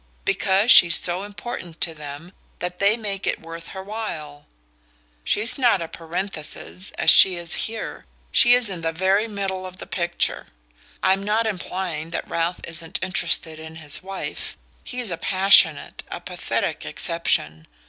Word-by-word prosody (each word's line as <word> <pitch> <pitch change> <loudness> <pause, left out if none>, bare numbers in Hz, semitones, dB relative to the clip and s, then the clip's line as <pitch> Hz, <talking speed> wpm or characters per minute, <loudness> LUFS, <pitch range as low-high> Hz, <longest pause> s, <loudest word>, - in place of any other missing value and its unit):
Because 195 +3 +3
she's 170 -2 +9
so 180 +1 +1
important 200 -4 -8
to 165 - 0
them 150 +3 -9 0.3
that 180 0 -4
they 200 +3 +3
make 200 -4 -4
it - - 0
worth 165 0 -10
her 190 -1 -8
while! 160 -9 -7 0.8
She's 225 +6 +3
not 240 -6 +3
a 165 - -4
parenthesis, 175 +2 -6
as - - +6
she 190 -2 +7
is 170 -1 -3 0.2
here 225 0 -7 0.2
she's 245 -1 +5
in 185 -4 -2
the 165 0 -2
very 190 +6 +1
middle 195 -3 -4
of 185 0 -9
the - - -8
picture. 175 -1 -1 0.6
I'm 190 +1 +3
not 215 +3 0
implying 180 -5 -4
that 170 - -4
Ralph 170 +2 -2
isn't 165 +1 -3
interested 170 -4 -1
in 160 0 -10
his 150 -2 -1
wife 195 +1 -6 0.3
he's 250 -5 -2
a 170 - -3
passionate, 190 +3 +4
a - - -5
pathetic - - -3
exception. 80 - -1
185 Hz, 150 wpm, -22 LUFS, 165-200 Hz, 0.8 s, she's